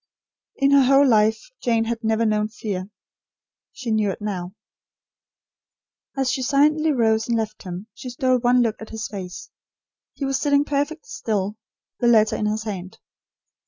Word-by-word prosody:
In 275 Hz, 0 st, +2 dB
her 280 Hz, 0 st, +7 dB
whole 275 Hz, +2 st, +5 dB
life, 220 Hz, -2 st, +4 dB, 0.2 s
Jane 230 Hz, -2 st, +2 dB
had 230 Hz, 0 st, -3 dB
never 220 Hz, +1 st, +1 dB
known 215 Hz, -1 st, +1 dB
fear. 205 Hz, -4 st, -5 dB, 0.8 s
She 240 Hz, -4 st, -5 dB
knew 215 Hz, -2 st, +2 dB
it 190 Hz, -, -4 dB
now. 190 Hz, -3 st, -5 dB, 1.6 s
As 270 Hz, -2 st, +1 dB
she 265 Hz, -, -2 dB
silently 300 Hz, +4 st, +3 dB
rose 225 Hz, -4 st, +2 dB
and 235 Hz, -1 st, +1 dB
left 215 Hz, -1 st, -3 dB
him, 180 Hz, +1 st, -7 dB
she 255 Hz, -, -8 dB
stole 255 Hz, +1 st, +1 dB
one 245 Hz, +1 st, +3 dB
look 225 Hz, -2 st, -2 dB
at 220 Hz, -, -8 dB
his 220 Hz, 0 st, -5 dB
face. 185 Hz, -3 st, -8 dB, 0.6 s
He 280 Hz, -, -3 dB
was 270 Hz, 0 st, 0 dB
sitting 285 Hz, 0 st, +2 dB
perfectly 290 Hz, +2 st, -2 dB
still; 205 Hz, 0 st, -2 dB, 0.4 s
the 240 Hz, -, +2 dB
letter 220 Hz, -2 st, +4 dB
in 210 Hz, -, -1 dB
his 215 Hz, +1 st, -2 dB
hand. 190 Hz, -4 st, -6 dB
225 Hz, 160 wpm, -23 LUFS, 210-265 Hz, 1.6 s, her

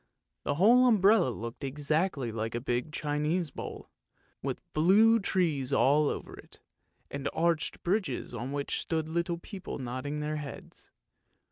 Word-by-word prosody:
" -, -, -55 dB
The 145 Hz, -, 0 dB
whole 240 Hz, -, +6 dB
umbrella 205 Hz, -, +5 dB
looked 115 Hz, +3 st, -6 dB
exactly 145 Hz, -1 st, -1 dB
like 110 Hz, +1 st, -3 dB
a -, -, 0 dB
big 125 Hz, +3 st, -2 dB
Chinese 150 Hz, +2 st, -1 dB
bowl, -, -, -8 dB, 0.5 s
with -, -, -4 dB
blue 210 Hz, +8 st, +5 dB
trees 160 Hz, -, 0 dB
all 145 Hz, +2 st, +4 dB
over -, -, -5 dB
it, -, -, -15 dB, 0.5 s
and 140 Hz, 0 st, -3 dB
arched 165 Hz, -2 st, 0 dB
bridges 180 Hz, -, -1 dB
on 120 Hz, +3 st, -4 dB
which 140 Hz, 0 st, -2 dB
stood 160 Hz, -1 st, -2 dB
little 170 Hz, +1 st, -1 dB
people 190 Hz, +2 st, -7 dB
nodding 130 Hz, +3 st, -4 dB
their 150 Hz, +1 st, -2 dB
heads. 145 Hz, -2 st, -9 dB
150 Hz, 145 wpm, -30 LUFS, 135-175 Hz, 0.5 s, whole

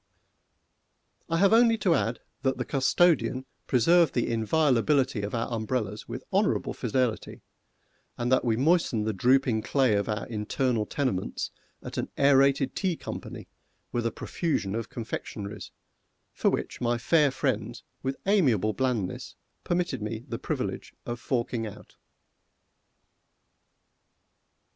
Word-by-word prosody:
I 165 Hz, -, +1 dB
have 200 Hz, +4 st, +4 dB
only 230 Hz, 0 st, +5 dB
to 185 Hz, -5 st, +2 dB
add 120 Hz, -6 st, 0 dB, 0.2 s
that 135 Hz, -1 st, 0 dB
the 125 Hz, -, -2 dB
custodian 135 Hz, -2 st, +2 dB, 0.2 s
preserved 165 Hz, +6 st, +4 dB
the 120 Hz, -, +1 dB
inviolability 130 Hz, 0 st, +2 dB
of 100 Hz, +3 st, -3 dB
our 115 Hz, -, -1 dB
umbrellas 110 Hz, -2 st, -2 dB
with 125 Hz, +2 st, -6 dB
honorable 200 Hz, +2 st, +1 dB
fidelity, 125 Hz, -1 st, -2 dB, 0.7 s
and 120 Hz, +1 st, -1 dB
that 130 Hz, -, +4 dB
we 115 Hz, -2 st, +1 dB
moistened 135 Hz, -6 st, +2 dB
the 110 Hz, -, 0 dB
drooping 125 Hz, +2 st, +3 dB
clay 130 Hz, -1 st, +2 dB
of 100 Hz, +2 st, 0 dB
our 105 Hz, +1 st, -2 dB
internal 115 Hz, +1 st, -1 dB
tenements 130 Hz, -10 st, -2 dB, 0.3 s
at -, -, -5 dB
an -, -, -2 dB
Aërated 140 Hz, -1 st, +4 dB
Tea 185 Hz, -4 st, 0 dB
Company -, -, -7 dB, 0.4 s
with 120 Hz, -1 st, 0 dB
a -, -, -2 dB
profusion 110 Hz, -, -2 dB
of 115 Hz, 0 st, -3 dB
confectionaries, 105 Hz, -3 st, -6 dB, 0.6 s
for -, -, +2 dB
which -, -, -3 dB
my 120 Hz, 0 st, +1 dB
fair 150 Hz, +5 st, +3 dB
friends 120 Hz, -4 st, -2 dB, 0.2 s
with 135 Hz, 0 st, -2 dB
amiable 130 Hz, -, +3 dB
blandness 120 Hz, -8 st, -2 dB, 0.3 s
permitted 175 Hz, -8 st, -1 dB
me 110 Hz, +2 st, -4 dB
the -, -, -4 dB
privilege -, -, -4 dB
of 120 Hz, 0 st, -4 dB
forking 120 Hz, -2 st, -2 dB
out. 105 Hz, -, -12 dB
125 Hz, 130 wpm, -27 LUFS, 110-140 Hz, 0.7 s, only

